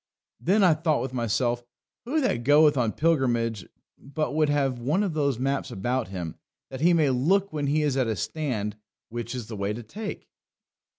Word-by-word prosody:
Then 200 +4 +3
I 180 -3 +6
thought 155 -1 0
with 130 - -5
myself, 120 0 0 0.4
who 300 +6 0
that 120 - 0
goeth 150 +3 +5
on 120 -4 +1
pilgrimage 120 - +1 0.3
but 145 +3 -3
would 155 -1 +2
have 135 -4 +1
one 150 - +1
of 190 -5 -1
those 140 -5 +1
maps 135 +2 -1
about 120 +5 -2
him, 90 -4 -6 0.3
that 130 0 -6
he 175 +2 +5
may 155 -5 +3
look 185 +10 +2
when 145 -2 -1
he 150 +2 +2
is 145 -3 +1
at 130 -3 +1
a 110 - 0
stand, 110 -3 -3 0.3
which 120 +1 -5
is 125 -3 -4
the 110 0 -7
way 100 +1 -2
to 120 +2 -7
take?" 205 - -7
135 Hz, 190 wpm, -26 LUFS, 120-155 Hz, 0.4 s, I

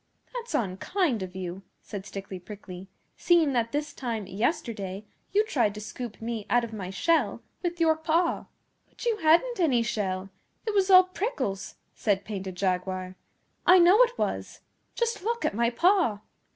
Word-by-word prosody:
'That's 485 -1 -4
unkind 235 - 0
of 185 0 -6
you,' 185 0 -5 0.2
said 200 -1 -7
Stickly 195 -1 -7
Prickly, 185 -1 -10 0.3
'seeing 330 -5 +4
that 230 -2 0
this 295 0 -2
time 230 -5 -3
yesterday 210 - -2 0.3
you 420 +2 +3
tried 235 - +1
to - - -6
scoop 225 +1 -7
me 225 -2 -4
out 240 0 +3
of 230 -1 -6
my 195 -4 -5
shell 330 - +1 0.2
with 345 -1 -3
your 320 -1 +4
paw.' 325 +2 +1 0.4
'But - - -10
you 460 -2 +2
hadn't 380 +8 +3
any 265 -9 +3
shell. 195 -4 -2 0.3
It 435 - -1
was 395 -1 +2
all 370 -1 +9
prickles,' 330 - -3 0.2
said 200 -2 0
Painted 190 -3 -5
Jaguar. 185 0 -2 0.5
'I 365 - +9
know 365 +6 +7
it - - +3
was. - - -3 0.3
Just 470 -3 -1
look 465 +4 -1
at - - +1
my 235 +2 +2
paw! 335 - +2
235 Hz, 165 wpm, -27 LUFS, -, 0.5 s, all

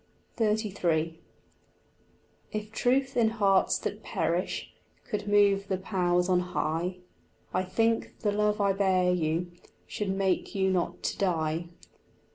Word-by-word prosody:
XXXIII 185 -7 0 1.3
If 215 0 -4
truth 265 +4 +1
in 230 -2 +4
hearts 200 -4 +3
that - - -4
perish - - -2 0.3
Could 210 -2 -3
move 200 -1 +4
the 190 - 0
powers 180 -2 +1
on 180 -1 +3
high, 180 0 -2 0.6
I 185 - +2
think 225 +5 0
the 210 - +1
love 210 +1 +1
I 200 -1 +3
bear 185 -2 +2
you 170 +1 -1 0.3
Should 205 -2 -4
make 190 0 0
you 190 -1 +2
not 180 -2 -1
to - - -2
die. 165 -3 0
190 Hz, 125 wpm, -28 LUFS, 180-210 Hz, 1.3 s, in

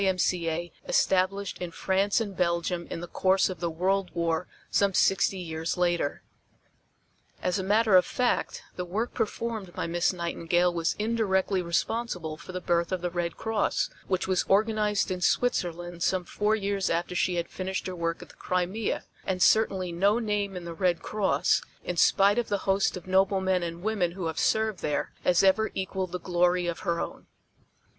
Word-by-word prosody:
M.C.A. 175 -3 0 0.2
established 195 - +1
in 180 - -4
France 195 +5 +1
and 205 -4 -4
Belgium 170 0 0
in 165 - -5
the 175 - -6
course 190 +3 +2
of 180 - -7
the 170 0 -1
World 185 +3 0
War 170 0 0 0.2
some 200 -2 +2
sixty 195 0 +3
years 165 -1 -3
later. 175 -4 0 1.2
As 180 +2 +1
a - - -2
matter 210 +1 +3
of 180 - +8
fact 250 -1 -1
the 180 - -2
work 205 +7 -3
performed 220 -4 -3
by - - -2
Miss 170 +1 +1
Nightingale 175 0 0
was 165 -1 0
indirectly 205 -4 +1
responsible 175 -1 -2
for 175 - -10
the 185 - -4
birth 170 -1 0
of 185 -2 -1
the 175 0 -2
Red 170 -1 -2
Cross 220 -2 0 0.2
which 185 -1 0
was 185 -1 +2
organized 210 0 +2
in 180 -1 -3
Switzerland 175 -6 0
some 185 +1 +1
four 210 +4 +1
years 200 -2 -1
after 170 +2 -1
she 180 0 +1
had 170 -1 -1
finished 190 0 -4
her 185 - -4
work 165 -1 -2
at - - -15
the - - -16
Crimea, 185 +4 -1 0.2
and 185 -1 0
certainly 190 -3 +3
no 200 +6 +3
name 205 -4 -1
in 175 - -7
the 170 - -5
Red 175 -1 0
Cross, 190 -7 +1 0.2
in 180 - -3
spite 200 +5 +4
of 240 - -2
the 205 - +1
host 195 0 +2
of 180 - -10
noble 190 +1 +3
men 190 -1 +1
and 170 0 -5
women 200 -5 0
who 185 -2 -5
have 160 -1 -2
served 220 -2 +1
there, 150 - -2
has 180 0 +3
ever 205 +3 +4
equaled 190 -1 -3
the 180 - -3
glory 180 0 +1
of 170 -1 -3
her 170 -2 -1
own. - - -6
185 Hz, 180 wpm, -27 LUFS, 175-200 Hz, 1.2 s, of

